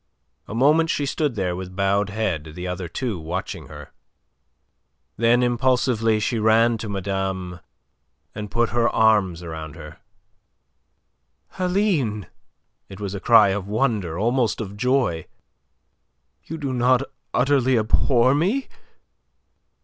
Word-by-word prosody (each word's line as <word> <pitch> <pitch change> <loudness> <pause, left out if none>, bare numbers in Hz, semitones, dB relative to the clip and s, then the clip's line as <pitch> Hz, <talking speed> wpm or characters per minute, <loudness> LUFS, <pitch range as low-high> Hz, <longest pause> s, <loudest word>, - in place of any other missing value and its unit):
A 110 - -6
moment 155 +6 +3
she 145 - 0
stood 140 -2 -1
there 90 -3 -1
with 90 0 -7
bowed 100 +1 +1
head, 90 -8 -3
the 90 - -6
other 90 0 -4
two 105 +3 -4
watching 85 -1 -5
her. 75 -1 -11 1.2
Then 120 +2 +3
impulsively 120 -2 +1
she 110 +2 -1
ran 115 +1 +3
to 110 - -5
madame 95 -2 -3 0.7
and 105 -1 -6
put 115 +3 +1
her 120 0 +1
arms 100 -6 +2
about 80 -2 -7
her. 75 -1 -11 1.6
"Aline!" 180 - 0 0.6
It 95 0 -10
was 100 -2 -4
a 100 - -4
cry 110 -1 +6
of 95 0 -3
wonder, 105 -7 -1
almost 120 +3 0
of 100 -3 -6
joy. 120 - 0 1.2
"You 160 - -6
do 140 -4 -3
not 125 +1 +3 0.3
utterly 130 -1 +2
abhor 120 +3 +3
me!" 195 - 0
110 Hz, 125 wpm, -22 LUFS, 95-125 Hz, 1.6 s, cry